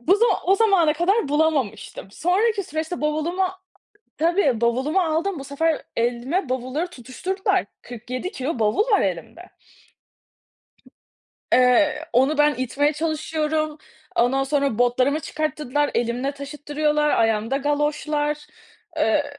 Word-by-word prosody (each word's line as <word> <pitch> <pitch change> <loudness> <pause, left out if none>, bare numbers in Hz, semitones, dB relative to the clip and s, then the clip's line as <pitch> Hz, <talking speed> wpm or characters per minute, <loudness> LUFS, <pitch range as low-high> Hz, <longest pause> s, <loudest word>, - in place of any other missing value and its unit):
bu 365 +12 +3
zam 470 +3 +3 0.2
o 385 - +5
zamana 385 -8 +4
kadar 345 +3 +1
bulamamıştım. 295 -10 -1
Sonraki 400 - +1
süreçte 315 +1 -4
bavulumu 310 +5 0 0.7
tabii 320 - +2
bavulumu 260 +9 +1
aldım. 335 +1 -1
Bu 275 - -7
sefer 315 +3 0
elime 245 +8 -1
bavulları 260 +6 -2
tutuşturdular, 360 +7 -2 0.2
47 250 +7 -6
kilo 270 - -3
bavul 225 - +1
var 415 - +4
elimde. - - -4 2.0
Eee, 295 +5 +4
onu 270 +5 +3
ben 295 0 +4
itmeye 275 +4 0
çalışıyorum, 310 0 -2 0.4
ondan 265 +3 +2
sonra 275 -4 0
botlarımı 255 +5 +2
çıkarttırdılar, 295 -2 -2
elimle 245 +4 -1
taşıttırıyorlar, 295 +1 -1
ayağımda 225 +2 +1
galoşlar. 295 +1 -1 0.5
Eee, 295 -1 +2
295 Hz, 110 wpm, -23 LUFS, 260-320 Hz, 2.0 s, o